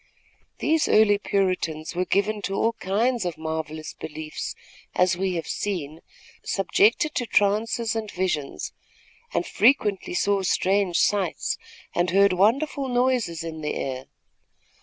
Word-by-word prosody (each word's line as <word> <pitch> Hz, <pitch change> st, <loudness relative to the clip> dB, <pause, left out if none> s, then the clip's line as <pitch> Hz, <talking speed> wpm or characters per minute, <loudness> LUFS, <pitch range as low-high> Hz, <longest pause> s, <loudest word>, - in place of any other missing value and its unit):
These 315 Hz, 0 st, +2 dB
early 205 Hz, -1 st, +5 dB
Puritans 185 Hz, -6 st, -1 dB
were 180 Hz, +1 st, 0 dB
given 205 Hz, +2 st, 0 dB
to 195 Hz, -, -2 dB
all 230 Hz, +3 st, +1 dB
kinds 230 Hz, +4 st, 0 dB
of 175 Hz, -3 st, -3 dB
marvellous 160 Hz, -1 st, -4 dB
beliefs, 155 Hz, 0 st, -6 dB, 0.4 s
as 180 Hz, 0 st, +3 dB
we 185 Hz, 0 st, -1 dB
have 165 Hz, -, -3 dB
seen, 165 Hz, -6 st, -3 dB, 0.4 s
subjected 215 Hz, +9 st, +2 dB
to 245 Hz, -, -2 dB
trances 220 Hz, +3 st, +1 dB
and 220 Hz, -2 st, -3 dB
visions, 175 Hz, -7 st, -2 dB, 0.6 s
and -, -, 0 dB
frequently 210 Hz, -9 st, +2 dB
saw 200 Hz, +2 st, +2 dB
strange 190 Hz, -1 st, +1 dB
sights, 200 Hz, -4 st, +1 dB, 0.3 s
and 175 Hz, +1 st, +1 dB
heard 200 Hz, +2 st, +4 dB
wonderful 265 Hz, +9 st, +2 dB
noises 245 Hz, -9 st, +1 dB
in 160 Hz, -1 st, -6 dB
the 150 Hz, -, -2 dB
air. 130 Hz, -1 st, -4 dB
195 Hz, 130 wpm, -25 LUFS, 170-215 Hz, 0.6 s, early